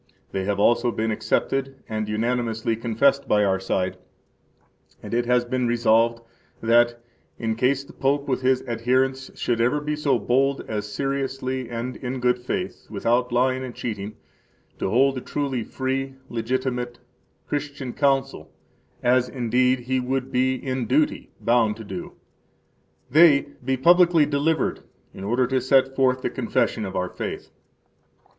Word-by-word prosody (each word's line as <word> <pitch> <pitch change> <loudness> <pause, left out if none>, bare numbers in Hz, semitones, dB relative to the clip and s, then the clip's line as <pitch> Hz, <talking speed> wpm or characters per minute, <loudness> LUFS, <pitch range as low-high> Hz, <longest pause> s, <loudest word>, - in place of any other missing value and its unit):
They 95 -1 -2
have 100 0 -1
also 120 +3 +3
been 110 0 -1
accepted 135 +5 -1
and 110 -2 -3
unanimously 115 0 -1
confessed 120 +5 +1
by 105 0 +3
our 95 -1 +1
side, 95 -1 -1 1.1
and - - -7
it 120 0 +1
has 125 0 +3
been 125 0 -1
resolved 115 0 +2 0.4
that, 120 +1 +3 0.4
in 110 -2 -1
case 130 +4 +1
the - - -15
Pope 140 +1 0
with 130 -2 0
his 130 0 +2
adherents 130 +2 0
should 115 -1 0
ever 125 +5 +2
be 150 +1 -2
so 145 -4 +1
bold 135 +5 +1
as 105 -1 -4
seriously 135 -1 -2
and 120 +2 -4
in 130 0 -4
good 125 0 +2
faith, 185 +10 -4
without 120 +4 0
lying 130 +2 +1
and 125 -2 -7
cheating, 105 -2 -5 0.6
to - - -1
hold 135 +4 +3
a - - -11
truly 135 -5 -2
free 135 +2 -3
[legitimate] 125 +1 -2 0.5
Christian 145 -3 -4
Council 135 - 0 0.5
(as, 125 0 +3
indeed, 125 0 +1
he 130 +2 -1
would 130 +1 -2
be 130 +1 +2
in 130 -1 -3
duty 305 0 +1
bound 115 -2 +2
to 115 - -8
do), 95 -4 -7 1.0
they 150 -2 +6
be 130 +1 0
publicly 170 +2 +5
delivered 150 +3 0 0.3
in 95 - -9
order 120 +5 +1
to 130 +1 0
set 135 +1 +3
forth 130 -1 +2
the - - -1
Confession 110 - 0
of 95 0 -6
our 90 0 -1
Faith. - - -6
125 Hz, 150 wpm, -24 LUFS, 115-135 Hz, 1.1 s, they